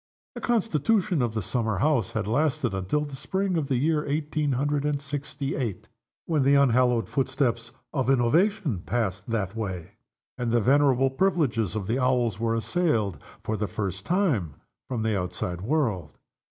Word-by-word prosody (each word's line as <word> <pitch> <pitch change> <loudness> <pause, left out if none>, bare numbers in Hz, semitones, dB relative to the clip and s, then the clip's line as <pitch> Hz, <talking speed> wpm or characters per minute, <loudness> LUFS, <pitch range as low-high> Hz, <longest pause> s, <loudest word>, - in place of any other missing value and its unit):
The - - -7
constitution 210 - +1
of 115 -2 -1
the 110 - -1
summer 110 0 -1
house 130 -3 +1
had - - -1
lasted 140 0 +1
until 95 +10 0
the 145 -2 -7
spring 190 +6 -1
of 155 -4 0
the 135 - 0
year 150 +4 +1
eighteen 150 0 -1
hundred 145 +2 0
and 145 -1 0
sixty 140 0 -4
eight, 115 -9 -4 0.4
when 155 -4 +1
the 140 +2 +4
unhallowed 125 -3 +3
footsteps 130 -4 -1 0.2
of 135 -3 0
innovation 150 - +2
passed 105 -4 -2
that 105 -3 -2
way; 95 -7 -5 0.4
and 120 -2 -1
the 120 - +4
venerable 135 +1 +3
privileges 135 - +1
of 105 -3 -2
the 115 +6 0
Owls 125 -5 +1
were 115 0 +1
assailed, 115 - 0 0.2
for 110 - -1
the 105 0 -2
first 95 0 -4
time, 150 - 0 0.3
from 120 -4 -2
the 110 - +1
world 95 -3 0
outside. 90 0 -4
130 Hz, 165 wpm, -26 LUFS, 110-150 Hz, 0.4 s, the